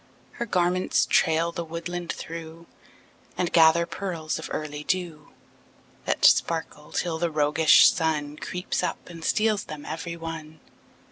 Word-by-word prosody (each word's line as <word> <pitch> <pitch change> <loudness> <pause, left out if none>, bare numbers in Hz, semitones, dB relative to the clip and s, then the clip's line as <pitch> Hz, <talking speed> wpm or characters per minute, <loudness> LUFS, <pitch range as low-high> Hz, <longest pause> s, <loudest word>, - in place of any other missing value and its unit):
Her 235 - -5
garments 180 -1 +1
trail 165 +1 +2
the 170 - -4
woodland 170 +1 -5
through, 165 0 -8 0.7
And 175 -1 -1
gather 165 0 +6
pearls 165 -3 -4
of 160 - -7
early 150 -1 -4
dew 170 -4 -3 0.8
That - - +1
sparkle 160 -2 +2
till 165 -2 -2
the 170 0 0
roguish 150 +1 +5
Sun 150 -3 -2
Creeps 180 +3 -3
up 180 - -4
and 165 -1 -10
steals 215 +2 +1
them 150 -1 -8
every 165 +2 -5
one. 160 -1 -7
165 Hz, 135 wpm, -25 LUFS, 155-175 Hz, 0.8 s, gather